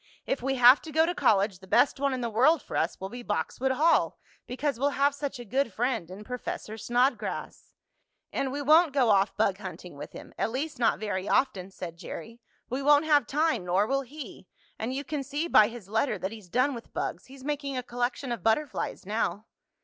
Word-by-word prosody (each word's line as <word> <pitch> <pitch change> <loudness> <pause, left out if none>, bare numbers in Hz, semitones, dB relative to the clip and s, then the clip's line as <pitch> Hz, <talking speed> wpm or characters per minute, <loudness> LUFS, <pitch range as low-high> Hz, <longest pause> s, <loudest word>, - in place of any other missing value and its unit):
If 270 - -1
we 270 +2 0
have 250 +2 +7
to 315 - -9
go 320 +2 +4
to 350 - -1
college 200 - +2
the 190 - -15
best 275 +7 +3
one 280 0 +1
in 260 -1 -2
the 235 - -1
world 270 +8 +4
for - - -7
us 165 - 0
will 190 - -5
be 245 +3 -7
Boxwood 240 +5 -1
Hall, 315 +5 +3 0.3
because 265 0 -2
we'll 280 +1 0
have 280 +1 +3
such 285 -1 -4
a 240 - -8
good 260 +3 0
friend 230 -5 -1
in 190 +3 -9
Professor 230 -2 -5
Snodgrass." 245 +5 -1 0.6
"And 270 - -1
we 285 +1 -3
won't 310 +1 +5
go 250 -5 +4
off 200 0 +2
bug 200 -2 +1
hunting 185 -4 -8
with 145 +1 -8
him - - -11
at - - +1
least 270 +3 -4
not 235 - +3
very 205 -2 -3
often," 195 -8 +1
said 175 -3 -8
Jerry. 230 +8 -8 0.3
"We 255 +3 -3
won't 290 +2 +5
have 295 -6 +4
time, 305 - +1
nor 180 +3 +2
will 275 +4 0
he. 260 -8 -10 0.3
And 225 +3 -2
you 270 +2 -3
can 295 -1 -3
see 290 +5 -3
by 215 -10 +6
his 230 -4 -9
letter 220 +2 0
that 190 +1 -4
he's 215 -5 -11
done 255 +7 +2
with 235 -2 -10
bugs. - - -3
He's 265 0 -13
making 280 -2 -3
a 250 - -2
collection 245 +2 -3
of 235 - -3
butterflies 250 +1 -1
now." 210 -1 -2
250 Hz, 215 wpm, -28 LUFS, 210-280 Hz, 0.6 s, have